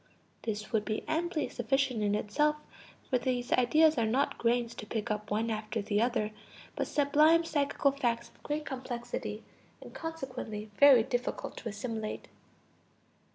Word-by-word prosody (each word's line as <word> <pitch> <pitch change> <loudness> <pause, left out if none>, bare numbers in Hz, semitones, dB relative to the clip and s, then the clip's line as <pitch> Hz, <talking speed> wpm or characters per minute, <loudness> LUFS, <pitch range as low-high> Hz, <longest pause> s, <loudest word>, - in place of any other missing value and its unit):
[This 215 -1 -4
would 220 -3 +2
be 215 0 -2
amply 320 0 0
sufficient 255 -1 0
in 205 0 +2
itself, 295 +9 +1 0.5
for 255 - +1
these 245 -1 -2
ideas 305 +4 +4
are 230 - +2
not 265 +6 +1
grains 235 0 +1
to 210 - -8
pick 220 +1 -2
up 210 0 -3
one 225 +2 0
after 215 +1 -3
the 205 0 0
other, 235 -3 +1 0.4
but - - -1
sublime 305 +3 +4
psychical 285 -3 +1
facts 235 -4 -1
of - - -26
great 300 +1 -3
complexity, 255 - -5 0.4
and, - - -12
consequently, 255 -10 -6
very 275 -5 +8
difficult 245 +2 -3
to 230 - -5
assimilate. 220 0 -5
245 Hz, 150 wpm, -31 LUFS, 220-285 Hz, 0.5 s, very